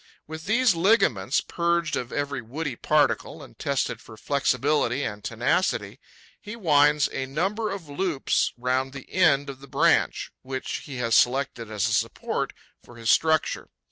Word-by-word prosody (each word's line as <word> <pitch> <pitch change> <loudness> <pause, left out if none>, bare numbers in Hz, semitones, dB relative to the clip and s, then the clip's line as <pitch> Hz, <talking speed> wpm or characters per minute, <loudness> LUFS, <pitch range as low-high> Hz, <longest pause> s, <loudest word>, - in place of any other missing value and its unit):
With 160 0 -8
these 235 +1 +4
ligaments, 165 - +2
purged 170 -2 0
of 125 -1 -4
every 145 0 -2
woody 140 +3 -5
particle - - +1
and - - -16
tested - - -1
for 110 - -13
flexibility 140 0 +1
and 105 -1 -5
tenacity, - - -1 0.4
he 210 +2 -8
winds 150 -7 +4
a 135 -1 -3
number 195 +10 -1
of 190 -5 -6
loops 145 0 0
round 130 +2 -1
the 140 -2 -11
end 145 -6 +3
of 135 -1 -7
the 140 - -13
branch - - +2
which 130 0 -4
he 140 - -7
has 115 -2 -1
selected 125 -1 +2
as 105 -2 0
a - - -1
support - - -1 0.3
for 120 - -15
his 115 -1 +1
structure. 160 -1 +1
140 Hz, 155 wpm, -25 LUFS, 125-165 Hz, 0.4 s, these